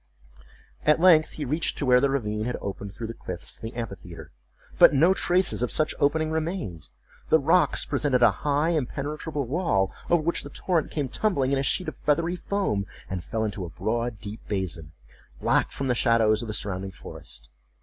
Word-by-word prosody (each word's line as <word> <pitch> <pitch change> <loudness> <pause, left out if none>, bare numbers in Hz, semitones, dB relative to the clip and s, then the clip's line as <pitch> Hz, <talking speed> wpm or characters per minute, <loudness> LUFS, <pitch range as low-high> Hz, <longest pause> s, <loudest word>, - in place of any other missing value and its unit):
At 150 +1 +4
length 165 -3 +5
he 150 - -5
reached 150 +5 -1
to 145 - -2
where 125 -1 +5
the 140 - +3
ravine 105 -5 -1
had 125 - -2
opened 100 0 -6
through 115 - -7
the 115 - -5
cliffs 90 -5 -5
to - - -11
the 115 +1 -7
amphitheatre; 100 -7 -7 0.5
but - - +8
no 165 +7 +5
traces 185 -6 +2
of 125 - 0
such 155 - +1
opening 155 +2 +1
remained. 160 - -3 0.4
The - - +6
rocks 165 +5 +3
presented 130 -4 +1
a 115 - +7
high 145 +2 +1
impenetrable 150 0 -2
wall 120 - 0 0.2
over 170 -2 +3
which 170 +2 +1
the 145 - -8
torrent 165 +1 -1
came 145 -3 -2
tumbling 140 - 0
in 140 - +2
a - - 0
sheet 180 +5 +1
of 155 - -5
feathery 165 +4 +1
foam, 175 - -1 0.2
and 90 -2 -3
fell 110 +5 -2
into 105 -3 -3
a 85 - -6
broad 115 +3 -2
deep 105 +3 -7
basin, 85 -6 -3 0.5
black - - +2
from 135 - -4
the 125 - +2
shadows 115 -3 +3
of 120 - -6
the 110 - -4
surrounding 95 -2 -2
forest. 85 -6 -10
130 Hz, 190 wpm, -26 LUFS, 105-155 Hz, 0.5 s, but